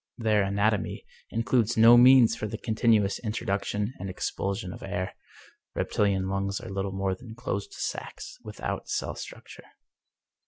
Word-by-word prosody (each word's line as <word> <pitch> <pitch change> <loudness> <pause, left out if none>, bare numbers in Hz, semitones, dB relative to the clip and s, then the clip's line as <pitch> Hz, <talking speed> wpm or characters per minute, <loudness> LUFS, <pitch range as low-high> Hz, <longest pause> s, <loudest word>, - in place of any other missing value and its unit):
Their 110 -3 +2
anatomy 100 +1 0 0.2
includes 115 0 +1
no 115 +2 +9
means 125 -1 +7
for 105 - -4
the 110 +1 -5
continuous 110 -3 +2
introduction 105 0 -2
and 95 +1 -5
expulsion 95 +1 -3
of - - -11
air; 95 -1 -3 0.6
reptihan 95 -2 +1
lungs 100 +1 -1
are - - -9
little 95 0 -2
more 95 0 -1
than 110 +4 -10
closed 130 - -4
sacs, - - -6
without - - -5
cell - - -2
structure. - - -10
105 Hz, 135 wpm, -27 LUFS, 95-115 Hz, 0.6 s, no